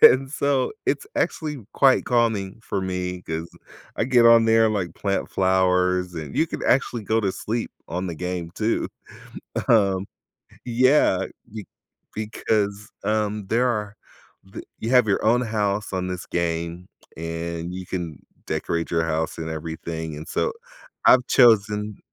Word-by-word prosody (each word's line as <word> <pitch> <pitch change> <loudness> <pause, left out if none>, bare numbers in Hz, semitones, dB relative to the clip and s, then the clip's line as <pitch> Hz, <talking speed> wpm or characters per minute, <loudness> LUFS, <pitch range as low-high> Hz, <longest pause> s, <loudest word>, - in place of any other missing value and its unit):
And 130 +1 +7
so, 140 -3 0
it's - - 0
actually 150 -3 -1 0.2
quite 135 -1 +4
calming 115 -5 +1
for 100 - -2
me 90 -1 -3
'cause 80 0 -4 0.5
I - - +1
get 125 -1 +4
on 115 -1 +7
there 115 0 +5
and, 110 - 0
like, 95 -4 -2
plant 100 -1 -1
flowers, 90 -1 +2
and 75 -4 -6
you 160 - +3
could - - -5
actually 125 -4 +1
go 110 +2 +1
to 100 -3 0
sleep 115 +4 -3 0.2
on 90 +2 -3
the 85 - -4
game 90 -1 -4
too. 110 +1 0 0.8
Um, 100 -4 +3 0.6
yeah, 130 +4 +3 0.3
you 110 -1 -6 0.5
Because, 105 -1 -1
um, 105 -1 -1
there 120 +5 +2
are 105 -3 -2 0.6
th - - -7 0.2
you 115 - -3
have 125 -3 +5
your 100 - +1
own 120 +3 +4
house 105 -3 -1
on 90 0 -1
this 90 -1 -5
game, 85 +1 -2 0.3
and 85 +1 -4
you 95 0 -6
can 85 -5 -4 0.3
decorate 85 0 -2
your 85 -1 +2
house 80 0 -2
and 80 0 -4
everything, 80 0 -5
and 75 - -8
so, 485 - -1 0.5
I've 130 -1 +6
chosen 105 -3 +4
100 Hz, 150 wpm, -23 LUFS, 90-115 Hz, 0.8 s, And